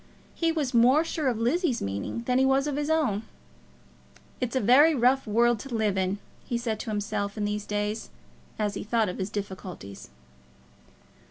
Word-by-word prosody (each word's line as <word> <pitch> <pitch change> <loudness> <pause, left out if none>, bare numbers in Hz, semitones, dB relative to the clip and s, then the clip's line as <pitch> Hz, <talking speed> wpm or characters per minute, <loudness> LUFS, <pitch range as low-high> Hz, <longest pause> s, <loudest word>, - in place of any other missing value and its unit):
He 330 -1 +1
was 295 -5 -2
more 250 +6 +5
sure 320 -3 -2
of 245 -3 +1
Lizzie's 255 - +1
meaning 100 - -4
than 250 +1 +1
he - - +4
was 270 +1 +3
of 295 -2 -2
his 295 +1 -2
own. 295 -11 +1 1.2
"It's 250 0 -2
a - - +3
very 280 +8 +6
rough 255 +1 +3
world 235 +2 +3
to 250 +1 -6
live 215 -3 +1
in," 190 +1 0 0.3
he 240 - -2
said 230 -3 -2
to - - -5
himself 205 -1 -2
in 210 - -1
these 210 0 -3
days 210 +1 -2 0.5
as 210 -2 -1
he - - -5
thought 220 0 +1
of 180 - -6
his 190 +1 -2
difficulties. 185 - -7
230 Hz, 180 wpm, -27 LUFS, 205-265 Hz, 1.2 s, very